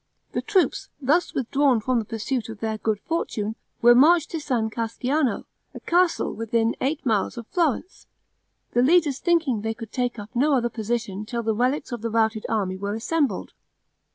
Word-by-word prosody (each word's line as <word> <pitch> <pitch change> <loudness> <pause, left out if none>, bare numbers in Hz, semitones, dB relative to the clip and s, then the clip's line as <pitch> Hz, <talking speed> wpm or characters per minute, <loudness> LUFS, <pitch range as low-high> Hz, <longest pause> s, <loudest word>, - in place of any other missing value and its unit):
The - - -2
troops, 380 - +1
thus 300 +6 +1
withdrawn 270 -1 +2
from 245 +2 +1
the 220 - -4
pursuit 225 +2 -3
of 220 -2 -8
their 220 0 -2
good 215 -2 0
fortune, 220 -10 -2 0.3
were 240 +1 +9
marched 310 +6 +5
to 325 - -2
San 235 -7 -1
Casciano, 245 +5 -1 0.3
a - - -6
castle 350 0 +1
within 230 0 0
eight 280 +3 -1
miles 220 0 0
of 235 - -6
Florence; 335 - -1 0.6
the 240 - +2
leaders 295 -1 +3
thinking 320 - +1
they 225 +1 -2
could 225 -2 -9
take 245 -2 -1
up 205 0 -8
no 285 +4 +3
other 240 -2 +1
position 220 -3 -3
till 235 +2 -4
the 220 0 +1
relics 255 +5 0
of 240 -3 -4
the 230 - -2
routed 220 -1 +1
army 195 -4 -1
were 200 +2 -3
assembled. 285 +5 -1
240 Hz, 180 wpm, -24 LUFS, 220-285 Hz, 0.6 s, were